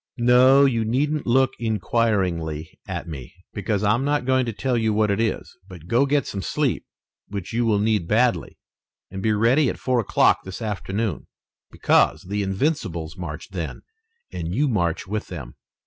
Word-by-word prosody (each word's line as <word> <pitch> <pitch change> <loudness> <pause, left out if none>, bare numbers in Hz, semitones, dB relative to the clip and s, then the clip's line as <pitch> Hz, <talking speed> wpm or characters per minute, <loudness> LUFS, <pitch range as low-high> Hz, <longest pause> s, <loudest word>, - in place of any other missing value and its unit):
No, 130 +3 +6
you 115 -4 +1
needn't 145 +7 -1
look 130 +2 +3
inquiringly 95 -8 -1
at - - -5
me, 70 -4 -8 0.2
because 100 0 -2
I'm 110 +5 +2
not 145 -2 0
going 130 -1 +2
to - - -1
tell 125 +4 -1
you 110 -2 +1
what 105 -1 +2
it 100 - 0
is, 110 -4 -2
but 90 -4 -12
go 120 +9 +2
get 140 -2 +1
some 100 - -4
sleep, 85 - -1 0.4
which 100 -1 -6
you 120 +1 +1
will 105 -2 +3
need 105 -4 +1
badly, 120 +4 +1 0.5
and 95 0 -5
be 110 - +1
ready 120 +7 +3
at - - -4
four 125 -1 0
o'clock 110 - +3
this 95 -1 -7
afternoon, 105 -3 -3 0.4
because - - +2
the 100 +3 -3
Invincibles 95 - -2
march 85 -2 -7
then 85 -4 -5 0.5
and 85 +2 -4
you 145 +4 +2
march 90 - 0
with 105 +2 -4
them." 65 -9 -8
110 Hz, 170 wpm, -23 LUFS, 95-125 Hz, 0.5 s, No